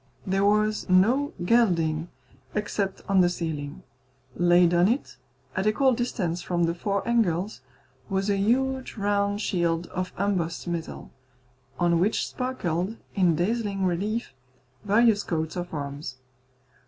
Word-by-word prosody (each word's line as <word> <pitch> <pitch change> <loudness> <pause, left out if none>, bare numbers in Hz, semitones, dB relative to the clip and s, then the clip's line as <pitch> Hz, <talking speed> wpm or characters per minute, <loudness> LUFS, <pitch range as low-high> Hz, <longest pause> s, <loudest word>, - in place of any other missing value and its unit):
There 195 +1 +1
was 210 0 +2
no 235 +11 +4
gilding, 170 -7 +2 0.5
except 205 -2 -2
on 195 -1 +4
the 175 - +4
ceiling. 160 -5 -4 0.5
Laid 175 0 +4
on 175 +1 +5
it, 225 - -1 0.4
at 190 +2 0
equal 260 +5 +3
distance 185 -8 -2
from 175 -1 -1
the 165 0 +2
four 200 +4 -2
angles, 210 -4 +1 0.5
was 195 0 0
a 200 - +2
huge 260 +6 0
round 205 0 0
shield 170 -3 0
of 185 0 -3
embossed 180 -4 -1
metal, 170 -2 -5 0.7
on 170 -1 +2
which 200 +5 +1
sparkled, 215 -6 -2 0.2
in 180 -5 +3
dazzling 200 +2 0
relief, 200 - -1 0.5
various 210 +1 +4
coats 160 -4 -3
of 175 -1 -4
arms. 140 -2 -5
190 Hz, 130 wpm, -26 LUFS, 170-215 Hz, 0.7 s, on